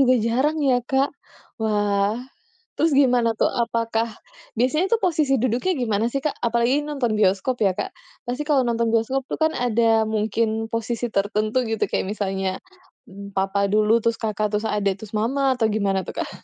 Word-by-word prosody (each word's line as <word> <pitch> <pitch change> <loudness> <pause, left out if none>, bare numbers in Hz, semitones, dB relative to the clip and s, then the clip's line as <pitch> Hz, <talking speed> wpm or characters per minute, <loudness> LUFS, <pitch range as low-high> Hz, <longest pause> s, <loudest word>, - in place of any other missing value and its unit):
juga 255 -1 +5
jarang 265 +7 +1
ya, 255 -2 +3
Kak. 265 +2 +1 0.5
Wah, 205 -1 +1 0.6
terus 325 +1 +2
gimana 250 -4 +4
tuh, - - +4 0.2
apakah 230 -1 -1 0.5
biasanya 305 - +1
posisi 320 -8 +1
duduknya 250 +9 0
gimana 220 -3 0
sih, 275 - -1
Kak? 290 +1 -2
Apalagi 235 +5 +2
nonton 280 -6 -2
bioskop 200 +5 +2
ya 195 - +4
Kak, 185 - -4 0.4
pasti 250 +4 -2
kalau 295 -3 +2
nonton 235 0 +1
bioskop 230 +4 +1
tuh - - -3
kan 315 0 +3
ada 230 -2 +2
mungkin 220 +1 -1
posisi 230 +1 -2
tertentu 215 +4 +1
gitu, 225 - 0
kayak - - -1
misalnya 195 -2 -2 0.8
papa 195 +1 0
dulu, 215 +2 +3
terus 230 0 0
Kakak, 215 -1 -1
terus 210 +1 -1
adik 200 -2 -1
terus 215 0 -9
mama 265 +5 +1
atau 225 -3 +1
gimana 200 -3 0
tuh, - - -7
Kak? - - -2
230 Hz, 165 wpm, -23 LUFS, 210-260 Hz, 0.8 s, juga